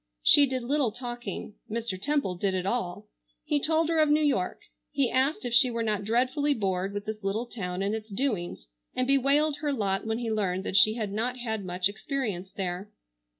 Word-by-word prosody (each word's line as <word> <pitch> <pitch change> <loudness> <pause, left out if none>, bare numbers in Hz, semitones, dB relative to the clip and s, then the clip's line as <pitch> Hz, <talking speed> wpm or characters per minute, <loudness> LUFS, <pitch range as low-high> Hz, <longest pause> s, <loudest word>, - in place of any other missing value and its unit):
She 285 -1 +7
did 260 -1 -2
little 270 -2 +1
talking. 240 -2 -6 0.2
Mr. 220 -4 -3
Temple 285 -7 +1
did 190 +2 -1
it 185 0 -1
all. 195 -5 -2 0.4
He 295 - +1
told 315 +2 +2
her 330 -1 +1
of 305 -1 +4
New 305 +1 +4
York. 255 -12 0 0.3
He 140 - +1
asked 265 +2 +1
if 240 - -2
she 250 +2 +6
were 230 -1 -2
not 210 -2 0
dreadfully 255 +6 +1
bored 190 -2 -1
with 205 0 -5
this 215 -1 -5
little 205 +5 -1
town 185 -6 -4
and 200 +2 0
its 220 0 -5
doings, 195 - -2 0.3
and 255 - +1
bewailed 280 +3 +3
her 295 -1 -1
lot 200 -5 -1
when 220 0 0
he 235 -2 -2
learned 190 -4 0
that 190 - -4
she 215 +2 +6
had 215 -4 -3
not 240 +5 -1
had 220 -4 -3
much 180 0 0
experience 205 -4 -4
there. 185 +1 -4
225 Hz, 200 wpm, -28 LUFS, 195-265 Hz, 0.4 s, She